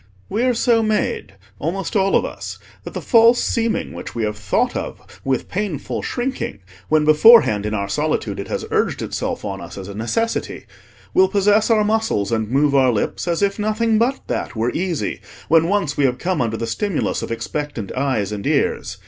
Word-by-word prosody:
We 215 - -1
are 250 -1 +2
so 230 -1 +3
made, 220 - -1 0.2
almost 175 +5 -3
all 195 -1 +3
of - - +3
us, - - -7 0.3
that - - -8
the - - -4
false 235 0 +5
seeming 230 -1 -1
which - - -8
we 115 - -1
have 105 0 -1
thought 105 -3 0
of - - -7
with 135 -2 -1
painful 190 -7 -3
shrinking 250 - -3 0.3
when 155 -1 +3
beforehand 155 - +6
in 105 - -2
our 100 -1 -2
solitude - - -1
it - - -5
has - - -3
urged - - 0
itself - - -3
on 95 -1 -4
us - - -9
as 95 -1 -7
a 100 - -7
necessity, 225 - -2 0.5
will 380 +1 +5
possess 205 - +3
our 220 -2 +4
muscles 215 - 0
and 110 -2 -1
move 140 +3 +2
our 130 -2 +4
lips 110 +9 -2
as 170 +3 0
if 200 +1 0
nothing 215 +1 +1
but 255 +4 +1
that - - -3
were 115 +2 0
easy 175 -2 -2 0.3
when 165 +1 +5
once 175 -7 0
we 145 - +3
have 125 -1 +1
come 180 0 -1
under 115 -2 -1
the 115 - -3
stimulus 160 - -1
of - - -5
expectant 115 -1 -4
eyes 130 -7 -1
and 100 -2 -4
ears. - - 0
165 Hz, 195 wpm, -20 LUFS, -, 0.5 s, beforehand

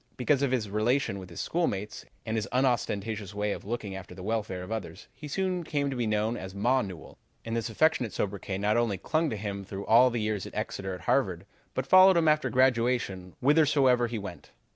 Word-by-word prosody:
Because 135 +2 +2
of 140 - +2
his 125 -4 0
relation 110 +1 0
with 95 -1 -10
his 85 - -6
schoolmates 105 - -2 0.2
and 110 -1 -2
his 110 -2 -1
unostentatious 110 -5 -1
way 105 0 -1
of - - -5
looking 105 -2 -4
after 95 -1 -9
the 90 - -9
welfare 105 -3 -2
of 90 - -9
others, 105 -3 -6
he 150 - -9
soon 185 +3 -1
came 145 -3 -1
to - - -3
be 120 -2 -1
known 110 +2 0
as 95 -3 -7
Ma 125 +6 +2
Newell, 90 -7 -9 0.3
and 115 0 -3
this 115 0 -2
affectionate 125 -2 +2
sobriquet 100 -1 -3
not 105 +3 +1
only 115 -5 +1
clung 155 - 0
to 110 - -3
him 100 -1 -4
through 100 +1 -7
all 120 +3 +6
the 120 - -3
years 105 -3 -2
at - - -12
Exeter 95 -1 -3
and 90 - -12
Harvard, 95 -9 +1 0.3
but 130 - -1
followed 185 +3 +7
him 165 -1 +3
after 155 0 +3
graduation 120 -7 +1
whithersoever 135 -4 +4
he 115 0 -4
went. 100 -4 -8
110 Hz, 210 wpm, -28 LUFS, 100-130 Hz, 0.3 s, followed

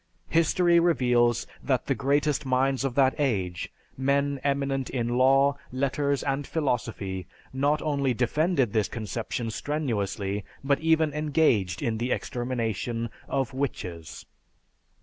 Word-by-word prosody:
History 170 +1 +4
reveals 125 -8 +3 0.2
that 130 -3 0
the 135 - +1
greatest 145 +4 +1
minds 130 0 +1
of 135 -3 -2
that 135 -1 +4
age, 95 -11 -1 0.2
men 140 +1 +1
eminent 140 -1 0
in 120 -3 -1
law, 135 +3 +4
letters, 140 +2 0
and 140 0 -1
philosophy, 115 - -2 0.3
not 145 +3 +1
only 140 -3 +1
defended 135 - +1
this 110 -2 +2
conception 115 +1 -4
strenuously, 105 -8 -2 0.2
but 140 0 +2
even 160 -2 +2
engaged 145 - +1
in 110 -2 -1
the 125 +2 -1
extermination 115 -2 -2 0.2
of 135 -3 -1
"witches." 90 - -5
135 Hz, 120 wpm, -27 LUFS, 115-145 Hz, 0.3 s, History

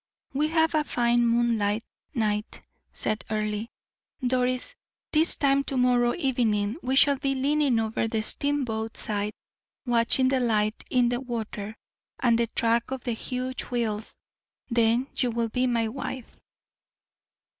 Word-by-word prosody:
"We 295 +3 +1
have 320 0 +2
a 305 -1 +2
fine 240 -3 +2
moonlight 230 -2 +1 0.3
night," 210 -2 -1 0.3
said 215 0 -2
Earle. 215 0 -2 0.6
"Doris, 255 - +1 0.4
this 315 +2 +6
time 275 -1 +2
to 270 - -2
morrow 245 -1 +3
evening 235 - 0
we 260 +1 -1
shall 280 0 +5
be 270 0 -1
leaning 280 -1 +2
over 225 0 -1
the 220 -1 -1
steamboat 225 -5 -1
side, 210 0 -2 0.5
watching 240 +2 +3
the 265 -1 +2
light 215 -3 0
in 245 -2 +3
the 245 0 -1
water, 220 -4 -5 0.4
and 240 -3 +3
the 235 0 +1
track 230 +1 +1
of 265 -1 -5
the 245 - -2
huge 255 +2 -3
wheels; 225 -3 -2 0.5
then 235 +2 +3
you 250 - +1
will 230 0 -1
be 250 +3 0
my 230 -2 +1
wife." 255 +1 -6
240 Hz, 140 wpm, -26 LUFS, 225-260 Hz, 0.6 s, this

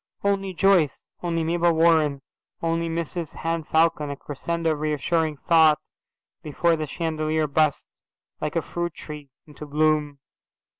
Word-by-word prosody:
"Only 195 -1 0
Joyce, 185 -7 +2
only 165 -2 -1
Mabel 170 +1 +2
Warren, 160 -4 +3 0.4
only 165 0 -1
Mrs 165 0 -4
Henne 165 0 -2
Falcon," 160 -1 +2
a 140 - -4
crescendo 165 +4 -2
of 155 - -2
reassuring 155 +1 0
thought 160 0 +5 0.6
before 170 +2 +1
the 155 -1 -4
chandelier 155 0 -1
burst, 150 0 +1 0.5
like 150 +1 -3
a 165 - +1
fruit 175 +1 -4
tree, 150 -2 -9 0.2
into 150 0 -11
bloom. 150 -1 +1
160 Hz, 135 wpm, -24 LUFS, 150-170 Hz, 0.6 s, thought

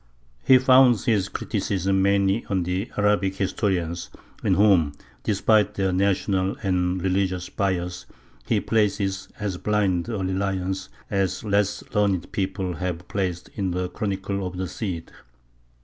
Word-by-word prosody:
He 130 - +7
founds 130 -2 +5
his 105 -6 +2
criticisms 95 0 -1
mainly 100 +2 +2
on 95 -2 +1
the 90 +6 -2
Arabic 105 -2 +2
historians, 90 -3 -1 0.3
in - - +3
whom, 95 -8 +4 0.3
despite 105 - +2
their 95 -2 0
national 95 0 +1
and 90 -1 +1
religious 95 -1 0
bias, 90 -2 -2 0.4
he - - +2
places 100 -3 0
as 100 -4 -2
blind 100 -2 0
a 110 - -2
reliance 95 0 -2 0.2
as 95 -2 0
less 100 -1 +1
learned 100 -4 +1
people 95 -3 -2
have 90 0 -4
placed 90 -3 -3
in 95 -3 -2
the 90 0 -2
Chronicle 100 -1 -3
of 90 0 -7
the 95 0 -2
Cid. 90 -4 -5
95 Hz, 135 wpm, -24 LUFS, 90-100 Hz, 0.4 s, He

